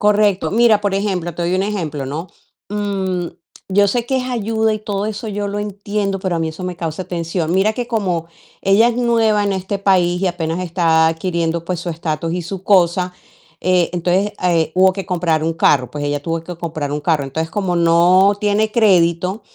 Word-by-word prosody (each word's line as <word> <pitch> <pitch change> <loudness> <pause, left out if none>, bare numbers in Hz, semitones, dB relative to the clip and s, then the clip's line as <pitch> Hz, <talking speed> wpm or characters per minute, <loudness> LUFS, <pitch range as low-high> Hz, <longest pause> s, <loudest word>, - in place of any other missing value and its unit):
Correcto. 205 -2 +2
Mira, 225 -1 +4
por 205 -1 -1
ejemplo, 190 -4 -1
te 175 - -5
doy 175 +2 0
un 190 - +1
ejemplo, 165 -9 -3
¿no?, 155 +6 -5 0.4
mm, 195 -4 -2 0.4
yo 200 +1 +4
sé 235 +2 -1
que 265 - -1
es 260 - 0
ayuda 220 -2 0
y 215 - -3
todo 205 -1 -3
eso 215 +1 -5
yo 205 -1 -3
lo 205 +1 -3
entiendo, 205 -1 -3
pero 185 -2 -1
a - - -2
mí 165 - -1
eso 160 +3 -7
me 180 -1 -4
causa 165 +2 -4
tensión. 170 -1 -3
Mira 195 +4 +2
que, 245 +1 -3
como 190 -8 -1 0.3
ella 195 +4 +4
es 240 - -1
nueva 230 -3 +2
en 200 - 0
este 190 +1 -2
país 180 -3 +2
y 195 - +2
apenas 170 -1 -2
está 165 -2 +3
adquiriendo, 170 0 -1
pues, 175 -1 -3
su 175 - -4
estatus 165 0 -3
y 180 - -2
su 185 +2 -7
cosa, 180 -2 +3 0.5
eh, 180 -2 +2
entonces, 180 +4 0
eh, 170 -3 +1
hubo 185 0 +4
que 195 0 -5
comprar 165 -4 0
un 165 - +1
carro, 140 -5 +2
pues 145 -1 -4
ella 145 0 -1
tuvo 165 +2 -2
que 180 - -6
comprar 155 -4 -4
un 150 - -3
carro. 155 -3 +1
Entonces, 160 +4 -4
como 190 -2 -1
no 175 +4 +4
tiene 210 +1 +1
crédito, 185 -2 +2
185 Hz, 205 wpm, -18 LUFS, 165-205 Hz, 0.5 s, Mira